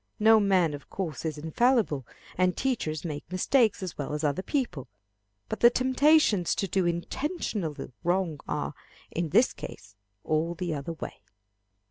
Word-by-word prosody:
No 220 Hz, +1 st, +7 dB
man 185 Hz, -6 st, +3 dB
of 145 Hz, -, -9 dB
course 165 Hz, -7 st, -4 dB
is 155 Hz, -2 st, -2 dB
infallible, 160 Hz, -, +1 dB, 0.3 s
and 185 Hz, 0 st, +2 dB
teachers 170 Hz, -, -1 dB
make 150 Hz, -3 st, -4 dB
mistakes 215 Hz, +3 st, +2 dB
as 180 Hz, -4 st, -6 dB
well 145 Hz, +1 st, -3 dB
as 150 Hz, -, -4 dB
other 145 Hz, +3 st, +1 dB
people. 190 Hz, -, -2 dB, 0.6 s
But -, -, -4 dB
the 235 Hz, -, +8 dB
temptations 260 Hz, -, +3 dB
to 195 Hz, -, -1 dB
do 185 Hz, 0 st, +1 dB
intentional 175 Hz, -, -2 dB, 0.3 s
wrong 175 Hz, -3 st, 0 dB
are, -, -, -2 dB, 0.4 s
in 170 Hz, -1 st, -2 dB
this 230 Hz, -, +4 dB
case, 105 Hz, -, -10 dB, 0.3 s
all 160 Hz, +2 st, 0 dB
the 175 Hz, -1 st, -2 dB
other 145 Hz, +3 st, -4 dB
way. 160 Hz, -, -8 dB
180 Hz, 150 wpm, -28 LUFS, 155-225 Hz, 0.6 s, the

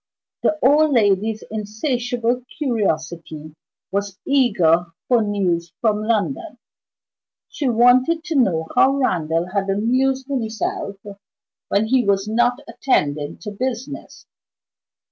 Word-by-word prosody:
The 310 Hz, -, +1 dB
old 295 Hz, +3 st, +4 dB
lady's 215 Hz, -1 st, +2 dB
insatiable 240 Hz, +3 st, -2 dB
curiosity 160 Hz, -, -2 dB, 0.4 s
was 200 Hz, -1 st, -2 dB
eager 185 Hz, -, +3 dB, 0.2 s
for 245 Hz, -2 st, +3 dB
news 180 Hz, -5 st, -1 dB
from 215 Hz, -2 st, +1 dB
London: 235 Hz, +8 st, -2 dB, 0.9 s
she 280 Hz, -4 st, -2 dB
wanted 255 Hz, +8 st, +4 dB
to 335 Hz, -2 st, -4 dB
know 180 Hz, -, +2 dB
how 270 Hz, +1 st, +4 dB
Randal 170 Hz, -, 0 dB
had 195 Hz, 0 st, -1 dB
amused 255 Hz, +6 st, +1 dB
himself 220 Hz, -6 st, -3 dB, 0.7 s
when 205 Hz, +2 st, +1 dB
he 250 Hz, +2 st, +2 dB
was 200 Hz, -1 st, +1 dB
not 240 Hz, +4 st, +1 dB
attending 150 Hz, -, -1 dB
to 210 Hz, -, -6 dB
business. 255 Hz, +5 st, -5 dB
220 Hz, 105 wpm, -21 LUFS, 195-255 Hz, 0.9 s, old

